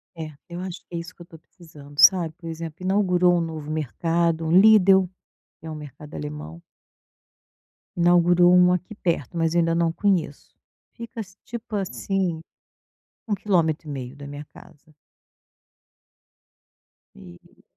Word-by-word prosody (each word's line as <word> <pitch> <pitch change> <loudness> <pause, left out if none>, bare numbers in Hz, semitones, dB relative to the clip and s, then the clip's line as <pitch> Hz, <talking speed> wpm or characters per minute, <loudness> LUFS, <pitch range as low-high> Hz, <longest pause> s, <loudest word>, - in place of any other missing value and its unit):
É, 160 -1 -6 0.2
eu 170 0 -7
acho 185 -1 -6
que 175 - -9
é - - -2
isso 170 +2 -9
que - - -17
eu - - -8
estou 165 -1 -15
precisando, 150 -3 -16
sabe? 165 +1 +6
Por 165 -1 -8
exemplo, 165 +2 -7
inaugurou 180 -2 +3
um - - 0
novo 155 -2 -5
mercado, 165 +2 -1
um 160 - -1
Lidl, 190 -1 +6 0.5
que - - -15
é 160 - -6
um - - -6
mercado 150 0 -11
alemão. 75 +2 -7 1.4
Inaugurou 175 0 +5
um 180 0 +6
aqui 180 +4 -3
perto, 170 -5 -2
mas 165 -1 +1
ainda 165 -1 +2
não 170 -1 +1
conheço. 175 -6 -1 0.4
Fica, 230 -1 -9 0.2
tipo 235 -1 -7
assim, 190 -3 -2 0.9
1 215 - 0
quilômetro 165 -6 0
e - - -5
meio 130 -2 -6
da 140 0 -10
minha 145 +1 -8
casa. 150 +1 -18 2.2
E 85 +7 -16
170 Hz, 145 wpm, -24 LUFS, 155-180 Hz, 2.2 s, sabe